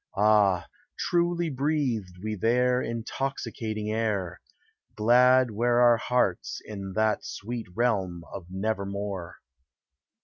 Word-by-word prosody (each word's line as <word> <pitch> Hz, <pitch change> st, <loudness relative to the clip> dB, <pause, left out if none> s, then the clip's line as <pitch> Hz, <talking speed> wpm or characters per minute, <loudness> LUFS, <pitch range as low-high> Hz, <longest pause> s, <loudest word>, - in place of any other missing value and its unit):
Ah, 100 Hz, -4 st, +4 dB, 0.3 s
truly 175 Hz, -1 st, 0 dB
breathed 130 Hz, -, -1 dB
we 110 Hz, 0 st, -2 dB
there 125 Hz, +4 st, +2 dB
Intoxicating 115 Hz, -3 st, -3 dB
air 100 Hz, -6 st, -2 dB, 0.3 s
— -, -, -41 dB
Glad 125 Hz, +3 st, +5 dB
were 120 Hz, +3 st, +2 dB
our 120 Hz, -1 st, +6 dB
hearts 120 Hz, -6 st, 0 dB
in 100 Hz, -3 st, -7 dB
that 110 Hz, 0 st, +1 dB
sweet 115 Hz, +2 st, -6 dB
realm 95 Hz, -8 st, 0 dB
of 90 Hz, -3 st, -7 dB
Nevermore. 100 Hz, -2 st, -3 dB
110 Hz, 105 wpm, -27 LUFS, 100-125 Hz, 0.3 s, our